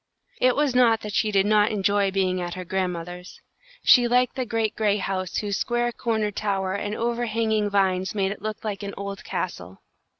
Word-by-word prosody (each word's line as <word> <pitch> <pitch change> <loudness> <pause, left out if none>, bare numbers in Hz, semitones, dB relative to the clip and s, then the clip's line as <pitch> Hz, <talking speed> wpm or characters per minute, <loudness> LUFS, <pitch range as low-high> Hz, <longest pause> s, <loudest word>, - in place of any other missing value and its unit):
It 255 -1 +3
was 290 -3 +1
not 235 -3 +4
that 210 -1 -6
she 215 +1 +1
did 195 -1 +3
not 210 0 +4
enjoy 200 -1 +1
being 185 -1 0
at 175 0 -4
her 185 0 -6
grandmother's. 180 -1 -4 0.4
She 245 -2 +6
liked 250 +1 +2
the 255 -2 -2
great 225 -1 -1
gray 210 -2 +1
house 190 -2 -3
whose 205 -2 -1
square 240 0 0
corner 220 -3 -1
tower 195 -2 -1
and 205 +1 -3
over 235 +1 -1
hanging 220 -1 0
vines 190 -1 +1
made 195 -1 0
it 210 - -7
look 215 0 -5
like 210 -2 -4
an 200 0 -6
old 200 0 -6
castle. 95 - -5
205 Hz, 195 wpm, -24 LUFS, 190-225 Hz, 0.4 s, She